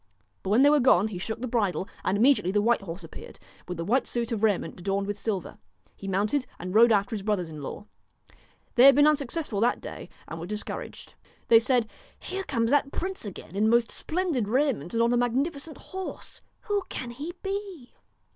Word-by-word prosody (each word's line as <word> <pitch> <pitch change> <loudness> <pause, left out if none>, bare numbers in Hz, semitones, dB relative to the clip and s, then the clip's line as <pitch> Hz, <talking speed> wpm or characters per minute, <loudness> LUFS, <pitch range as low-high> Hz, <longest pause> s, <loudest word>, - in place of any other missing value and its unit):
But 190 - -5
when 225 +6 +5
they 285 - +7
were 300 - +5
gone 220 -5 +4
he 185 -4 -6
shook 220 +5 -4
the 255 - -2
bridle, 200 -7 0 0.2
and 190 - +1
immediately 235 -5 +4
the 205 - +2
white 230 +2 +2
horse 175 -1 -7
appeared, 165 - -11 0.3
with 180 - -5
the 165 - -3
white 250 +7 +1
suit 235 -1 -3
of 220 -3 -2
raiment 210 -4 0
adorned 195 +2 -1
with 205 +1 -3
silver. 200 -3 -4 0.4
He 195 - -9
mounted 210 +8 0
and 180 +1 -6
rode 230 +2 +6
after 205 +2 +2
his 205 - -4
brothers 195 -5 -1
in 155 -2 -8
law. 175 +8 -7 0.9
They 250 - +6
had 275 -1 +9
been 290 +1 +6
unsuccessful 295 -5 +1
that 240 +2 +2
day - - -8 0.2
and 165 - -7
were 170 - -6
discouraged. 210 +1 -6 0.4
They 225 - +8
said: 240 -1 +1 0.2
' - - -30
Here 385 0 -3
comes 230 -5 0
that 285 -1 +2
prince 375 -7 -4
again 190 -2 -9
in 215 +2 +3
most 235 0 +3
splendid 315 - -1
raiment 245 - 0
and 230 - +3
on 235 +1 +2
a - - +3
magnifi 265 +6 0
cent 310 +2 -8
horse. 380 -1 -8 0.2
Who 410 -1 0
can 245 -2 -5
he 295 +8 -6
be 390 -9 -5
230 Hz, 210 wpm, -27 LUFS, 200-275 Hz, 0.9 s, had